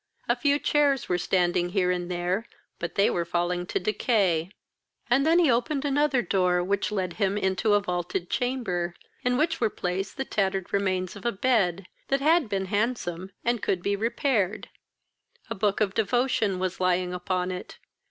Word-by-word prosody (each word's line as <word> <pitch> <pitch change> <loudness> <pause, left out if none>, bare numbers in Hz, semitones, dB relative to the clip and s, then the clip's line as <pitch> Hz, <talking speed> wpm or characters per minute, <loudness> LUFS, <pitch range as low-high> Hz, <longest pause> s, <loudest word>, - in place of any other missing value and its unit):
A - - +3
few 285 -2 +2
chairs 290 -2 +2
were 180 0 0
standing 175 -1 +1
here 180 -1 +1
and 175 -1 -2
there, 180 +5 -1 0.3
but 170 - -4
they 200 - +4
were 170 - 0
falling 175 +1 -1
to - - -1
decay. 185 -4 +1 0.6
He 245 - +4
then 320 +5 +4
opened 270 +4 +1
another 285 -3 +2
door, 180 -3 +2
which 200 +3 -1
led 185 -4 -2
him 200 +1 +2
into 205 +2 +2
a - - +5
vaulted 180 -2 -3
chamber, 180 -10 -1 0.3
in 250 0 +1
which 320 +1 0
were 225 - +3
placed 190 0 -3
the 270 - -2
tattered 195 -4 -1
remains 185 -2 0
of 200 - -10
a 235 - +1
bed, 195 -5 +1 0.2
that 275 - +1
had 310 -2 +3
been 195 -1 -1
handsome, 195 -4 -2 0.2
and 240 -2 +1
could 180 -2 -1
be 200 0 +1
repaired. 225 - 0 0.8
A - - +2
book 205 0 0
of 200 -2 +1
devotion 225 -3 +1
was 185 0 -3
lying 180 0 +1
upon 180 0 -2
it. 180 - -7
195 Hz, 170 wpm, -26 LUFS, 180-240 Hz, 0.8 s, a